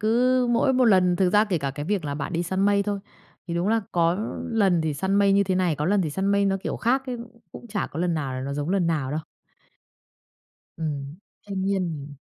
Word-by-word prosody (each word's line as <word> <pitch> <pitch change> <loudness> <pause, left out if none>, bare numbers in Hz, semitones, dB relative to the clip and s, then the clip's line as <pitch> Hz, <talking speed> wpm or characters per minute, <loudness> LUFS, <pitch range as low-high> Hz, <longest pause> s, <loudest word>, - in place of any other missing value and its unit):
cứ 245 +3 +3
mỗi 240 +3 +3
một 255 -1 +3
lần 180 -5 +4
thực 185 -2 +2
ra 210 +2 +5
kể 185 -6 -1
cả 140 -1 -2
cái 145 +2 -6
việc 195 -2 -1
là 145 -1 -3
bạn 145 +4 -4
đi 170 +1 0
săn 190 +2 -2
mây 200 0 +3
thôi, 205 -1 -2 0.5
thì 170 - -2
đúng 175 +3 0
là 225 +1 +2
có 170 0 +3 0.4
lần 195 -7 +3
thì 155 -2 -1
săn 190 +6 -1
mây 200 -1 +4
như 200 0 +4
thế 185 - 0
này, 180 -5 +1
có 150 - -2
lần 185 -4 +1
săn 190 +6 -2
mây 200 0 +3
nó 195 0 +2
kiểu - - -3
khác 265 +3 0
ấy, 250 -1 -3 0.4
cũng 240 - -10
chả 205 -1 -2
có 160 - -6
lần 175 -1 +1
nào 140 -4 -2
là 130 - -4
nó 140 +1 -4
giống 145 +4 -3
lần 190 -3 +2
nào 150 -5 -1
đâu. 155 +2 -2 1.6
Ừm, 150 -1 -4 0.3
thanh 195 -1 -3
niên, 195 -1 0
ừm. 145 -2 -7
185 Hz, 245 wpm, -25 LUFS, 155-205 Hz, 1.6 s, ra